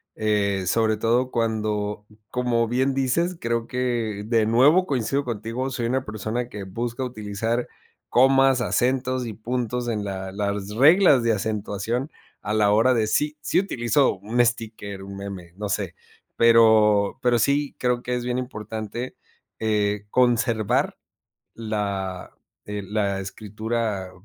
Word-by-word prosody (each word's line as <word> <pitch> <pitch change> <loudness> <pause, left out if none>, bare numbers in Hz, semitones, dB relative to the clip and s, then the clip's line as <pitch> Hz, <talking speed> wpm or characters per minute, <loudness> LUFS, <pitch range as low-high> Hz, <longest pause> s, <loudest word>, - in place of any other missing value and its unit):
eh, 100 -3 0
sobre 110 +3 +2
todo 120 +4 +1
cuando, 105 -2 -1 0.3
como 125 -2 +1
bien 130 +3 +1
dices, 165 +7 0
creo 115 0 -1
que 120 -5 -2
de 115 -1 +2
nuevo 140 +11 +5
coincido 140 -1 -1
contigo, 120 +3 -3
soy 120 -3 -2
una 130 +2 -1
persona 110 +3 -3
que 105 -3 -7
busca 115 +6 -4
utilizar 115 0 -2 0.4
comas, 135 0 +4
acentos 130 +2 0
y 115 - -5
puntos 120 +2 -3
en 105 -3 -2
la 95 -1 -5
las 100 0 -3
reglas 140 - +5
de 115 -1 +3
acentuación 110 +5 -2 0.3
a 105 - -3
la 105 -1 +3
hora 115 +5 +4
de 110 -2 +2
sí, 150 +7 0
sí - - +2
utilizo 135 - +1
un 115 +5 +1
sticker, 110 -4 -4
un 100 0 -8
meme, 95 -4 -8
no 105 0 -3
sé. 95 -3 -2 0.4
Pero 110 -3 +5
pero 120 -1 +3
sí 140 +4 +1
creo 125 -1 +1
que 125 - -2
es 125 - -3
bien 125 0 -1
importante, 110 0 -5 0.4
eh, 105 -2 0
conservar 115 -3 +1 0.6
la, 100 -4 -3 0.3
eh, 105 -1 -5
la 100 -2 -1
escritura 105 0 -3
115 Hz, 140 wpm, -24 LUFS, 105-125 Hz, 0.6 s, nuevo